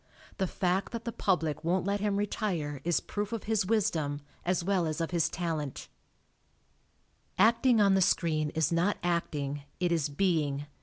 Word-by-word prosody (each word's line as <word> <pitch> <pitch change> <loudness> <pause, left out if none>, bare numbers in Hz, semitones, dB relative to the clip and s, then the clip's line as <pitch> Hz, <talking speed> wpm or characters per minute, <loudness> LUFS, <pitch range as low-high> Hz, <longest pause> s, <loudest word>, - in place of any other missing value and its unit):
The 190 - +1
fact 185 +4 -1
that 230 0 -5
the 235 - -2
public 165 -9 0
won't 175 +2 +1
let 200 +1 0
him 205 -1 0
retire 180 - -2
is 175 0 +1
proof 205 +1 -4
of 230 -2 -3
his 215 -3 0
wisdom, 160 -9 0 0.2
as 180 0 0
well 185 -2 +1
as 155 +1 -3
of 165 0 -2
his 170 -3 +2
talent 160 -6 -4 1.5
Acting 230 +3 +4
on 200 -2 +5
the 190 - +3
screen 155 -4 +2
is 160 -1 +1
not 175 +5 +2
acting, 145 -5 -1 0.2
it 180 -1 +1
is 160 -3 +1
being. 145 -3 0
175 Hz, 165 wpm, -30 LUFS, 155-200 Hz, 1.5 s, on